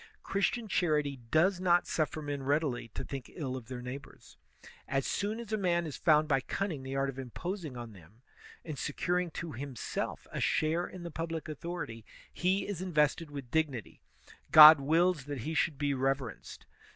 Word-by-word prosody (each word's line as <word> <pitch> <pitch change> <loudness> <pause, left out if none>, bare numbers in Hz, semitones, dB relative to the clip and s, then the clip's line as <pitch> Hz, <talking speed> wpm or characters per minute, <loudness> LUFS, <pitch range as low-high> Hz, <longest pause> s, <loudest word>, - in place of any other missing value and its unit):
Christian 215 +4 0
charity 150 -7 +1
does 175 +7 +3
not 175 -1 +3
suflEer 155 -1 -1
men 145 -1 -3
readily 140 -3 0
to - - -3
think 135 -3 -7
ill 135 -6 -3
of 125 -3 -8
their 125 -1 -6
neighbors. 130 +3 -9 0.5
As 135 -1 0
soon 210 +3 -1
as 225 -2 -6
a - - +2
man 175 -3 +1
has 150 - -5
found 155 -1 +4
by 135 -3 +2
cunning 175 -1 -3
the 135 +1 -5
art 135 0 +1
of 135 -1 -5
imposing 155 - -5
on 120 -2 -7
them 100 +6 -18 0.4
and 155 -4 -5
securing 180 +4 -1
to 165 +1 -6
himself 130 -1 -4
a - - -3
share 160 +3 +1
in 185 -2 -9
the 170 - -6
public 165 0 -4
authority, 150 -7 -6 0.3
he 185 +3 +1
is 200 -4 -4
invested 155 -2 +1
with 140 -4 -8
dignity; 150 -8 -1 0.5
God 155 0 +11
wills 165 +1 +2
that 145 -4 -5
he 155 +7 -3
should 160 -2 +1
be 145 0 0
reverenced. 135 -2 -3
150 Hz, 175 wpm, -31 LUFS, 135-175 Hz, 0.5 s, God